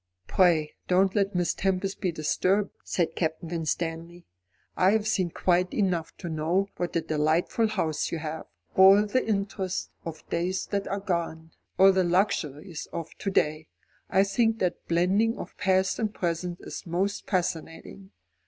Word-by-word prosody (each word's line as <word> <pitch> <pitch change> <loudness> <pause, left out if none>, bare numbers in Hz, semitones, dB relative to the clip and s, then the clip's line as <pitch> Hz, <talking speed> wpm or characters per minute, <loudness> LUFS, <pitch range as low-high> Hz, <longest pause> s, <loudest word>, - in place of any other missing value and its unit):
"Pray 165 - +3
don't 190 +1 +3
let 200 -1 0
Miss 175 -1 +1
Tempest 190 0 -1
be 185 - +1
disturbed," 185 +6 +1
said 170 -2 -1
Captain 160 0 -2
Winstanley. 165 +1 -3 0.5
"I 190 +2 +4
have 220 -1 +1
seen 185 -5 +1
quite 180 +2 +1
enough 180 -6 -1
to 175 - -7
know 170 +5 0
what 175 -1 -3
a 170 - +2
delightful 160 +8 +1
house 165 -8 -1
you 170 - -1
have 160 0 -5 0.3
all 195 +2 +7
the 235 +5 +1
interest 195 -3 -2
of 165 -1 -8
days 180 +2 -1
that 200 -1 -1
are 200 - -2
gone, 165 -4 -3 0.3
all 195 +1 +8
the 190 -1 +2
luxuries 170 -3 -1
of 165 -1 -6
to 195 - -2
day. 155 -4 0 0.4
I 190 - +4
think 225 +3 +1
that 180 -4 -2
blending 190 +7 +2
of - - -8
past 190 -1 +2
and 215 -2 0
present 175 -2 -3
is - - -8
most 190 +5 -1
fascinating. 180 +1 -3
180 Hz, 155 wpm, -27 LUFS, 165-195 Hz, 0.5 s, all